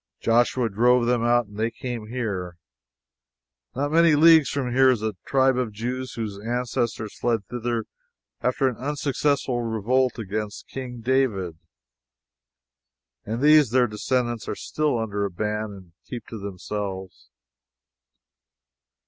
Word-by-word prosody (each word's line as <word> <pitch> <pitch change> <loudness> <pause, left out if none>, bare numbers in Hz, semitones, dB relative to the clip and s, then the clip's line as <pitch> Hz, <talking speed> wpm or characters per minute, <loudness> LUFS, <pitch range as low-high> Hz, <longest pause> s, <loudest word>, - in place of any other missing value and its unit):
Joshua 120 +1 +2
drove 120 +3 +3
them 120 -1 +1
out, 120 0 +3
and 105 0 -14
they 110 +1 +1
came 120 -2 -6
here. 100 -7 -4 1.2
Not 145 +3 -1
many 165 -1 +5
leagues 160 -1 +7
from 130 -4 -2
here 130 +1 +6
is 120 -4 +1
a 110 -1 -1
tribe 130 -1 +3
of 125 -4 -1
Jews 125 +4 -4
whose 105 -4 -5
ancestors 120 -1 -2
fled 115 -4 0
thither 120 0 -3 0.6
after 125 +2 +1
an 125 - -2
unsuccessful 140 -2 0
revolt 120 +3 +1
against 105 -1 -5
King 125 -3 -7
David, 110 -10 0 1.7
and 115 +5 -3
these 150 -3 +6
their 125 +1 +4
descendants 120 0 -1
are - - -2
still 150 -5 -1
under 105 -3 -2
a 100 - 0
ban 105 +3 -2
and 95 -4 -11 0.2
keep 120 -2 -6
to 110 - -7
themselves. 95 -1 -6
120 Hz, 130 wpm, -24 LUFS, 105-130 Hz, 1.7 s, leagues